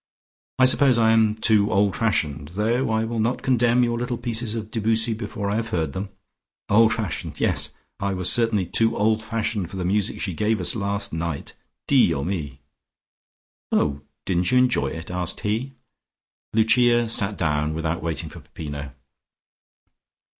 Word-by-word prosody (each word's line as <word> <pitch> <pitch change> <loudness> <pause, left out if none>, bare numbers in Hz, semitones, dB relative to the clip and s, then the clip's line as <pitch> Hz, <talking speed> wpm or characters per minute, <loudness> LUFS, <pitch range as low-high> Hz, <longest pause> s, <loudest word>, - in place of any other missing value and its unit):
"I 130 - +5
suppose 130 -1 +5
I 110 -1 +4
am 110 -1 +3
too 110 -2 +4
old 100 -3 +2
fashioned, 75 -8 -1
though 115 +5 0
I 110 0 0
will 115 0 -3
not 115 +3 -1
condemn 120 -1 +3
your 120 -1 -1
little 125 0 -3
pieces 115 -1 -3
of 110 -1 -6
Debussy 115 +1 +1
before 105 -2 -4
I 105 - 0
have 115 0 -2
heard 80 -8 -2
them. 95 +1 -5 0.6
Old 110 +2 +5
fashioned! 110 -5 -4
Yes! - - 0 0.3
I 100 -1 -1
was 90 -1 0
certainly 115 -5 +2
too 115 +6 +2
old 110 +1 +2
fashioned 110 -4 -3
for 95 - -8
the 90 - -3
music 100 +2 0
she 95 - -2
gave 105 +5 0
us 90 - 0
last 100 -3 -3
night. 80 -3 -4 0.3
Dio 70 - +3
mi!" 75 -7 -4 1.1
"Oh, 70 -1 +1 0.2
didn't 90 -1 0
you 125 - +4
enjoy 125 - +2
it?" 80 +5 -7
asked 90 -1 -2
he. 115 +6 -2 0.8
Lucia 120 +2 +3
sat 105 -3 +1
down, 75 0 0
without 80 +1 -2
waiting 80 0 -2
for - - -10
Peppino. 70 -2 -8
105 Hz, 160 wpm, -23 LUFS, 90-115 Hz, 1.1 s, I